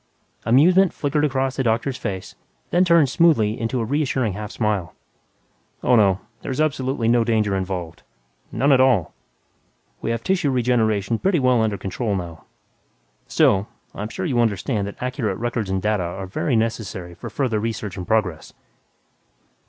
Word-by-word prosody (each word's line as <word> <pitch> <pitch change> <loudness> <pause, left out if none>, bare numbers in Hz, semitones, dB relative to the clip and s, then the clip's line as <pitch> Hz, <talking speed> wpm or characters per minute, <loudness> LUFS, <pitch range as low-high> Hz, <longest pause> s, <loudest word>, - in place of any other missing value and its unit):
Amusement 175 +10 +5
flickered 150 +1 -1
across 135 -2 0
the 135 - +1
doctor's 120 +3 0
face, 100 -7 -5 0.4
turned 170 -4 +4
smoothly 125 -7 +3
into 115 +3 -1
a 115 - -1
reassuring 130 -4 0
half 105 +1 -6
smile. 105 -8 -2 0.9
"Oh, 125 - +4
no. 100 -4 +4 0.2
There's 130 +2 -4
absolutely 135 -5 0
no 120 0 +4
danger 110 -3 +1
involved. 90 -3 -4 0.5
None 140 +2 +2
at 130 -1 +5
all. 120 -11 +2 0.9
We - - -3
have 115 0 -2
tissue 185 -6 +1
regeneration 115 -4 +1
pretty 190 -2 +2
well 125 -4 +3
under 110 -2 0
control 100 +3 -2
now. 85 -5 -6 0.8
Still, 100 +1 +3 0.3
I'm 105 +2 -5
sure - - -4
you 130 -8 0
understand 105 -1 0
that 100 - -8
accurate 125 -6 -2
records 115 -3 -2
and 95 0 0
data 105 -2 +1
are 90 +2 -4
very 115 +8 -1
necessary 105 -6 -2
to - - -8
further 125 -6 -1
research 110 -3 -4
and 90 -2 -6
progress." 100 -8 -1
115 Hz, 150 wpm, -22 LUFS, 100-130 Hz, 0.9 s, Amusement